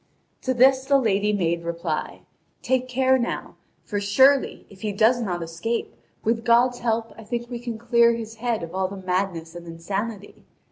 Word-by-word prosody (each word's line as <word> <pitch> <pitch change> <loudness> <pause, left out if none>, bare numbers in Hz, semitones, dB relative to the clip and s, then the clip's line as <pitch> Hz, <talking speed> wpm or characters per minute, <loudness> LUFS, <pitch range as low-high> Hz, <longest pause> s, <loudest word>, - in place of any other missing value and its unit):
To 260 -1 -1
this 260 +1 +5
the 275 0 +4
lady 210 -4 +1
made 170 -4 0
reply: 170 -2 -3 0.4
"Take 255 0 +1
care 260 +1 +3
now! 240 - -3 0.3
For 205 - -3
surely, 260 +7 +3
if 190 -2 -17
he 215 - -2
does 225 +4 +3
not 175 -6 -2
escape, 170 +8 -3 0.3
with 230 +1 0
God's 245 +1 +3
help 230 -1 -1
I - - -9
think 240 +2 -4
we 240 - -4
can 235 -2 -5
clear 235 0 +4
his 225 -1 -7
head 230 -4 -1
of 165 +1 -7
all 190 0 0
the 195 +1 -8
madness 180 -3 -2
and 175 0 -10
insanity. 200 +5 -5
225 Hz, 180 wpm, -24 LUFS, 190-240 Hz, 0.4 s, this